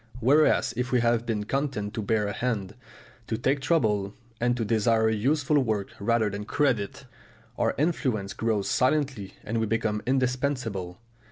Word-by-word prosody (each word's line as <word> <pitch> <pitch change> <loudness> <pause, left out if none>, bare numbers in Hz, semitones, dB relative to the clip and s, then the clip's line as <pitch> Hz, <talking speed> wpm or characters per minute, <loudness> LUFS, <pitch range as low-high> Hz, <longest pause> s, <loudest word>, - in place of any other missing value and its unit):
Whereas 145 +6 +3
if 125 +1 -2
we 125 -2 +3
have 115 0 +1
been 110 -3 -1
content 130 -4 -2
to 115 - -3
bear 105 0 +1
a 105 - -2
hand, 105 -6 -2 0.5
to 110 - -1
take 135 +4 +1
trouble, 105 -10 +1 0.2
and 120 +1 +1
to 115 - -1
desire 110 0 +2
useful 145 +7 +2
work 110 -5 -1
rather 115 +1 +2
than 100 0 -4
credit, 125 -3 0 0.5
our - - 0
influence 130 - 0
grows 110 -3 -1
silently 130 -7 0
and 115 +1 -2
we 110 - 0
become 110 -1 0
indispensable. 125 -8 -1
115 Hz, 155 wpm, -27 LUFS, 105-130 Hz, 0.5 s, Whereas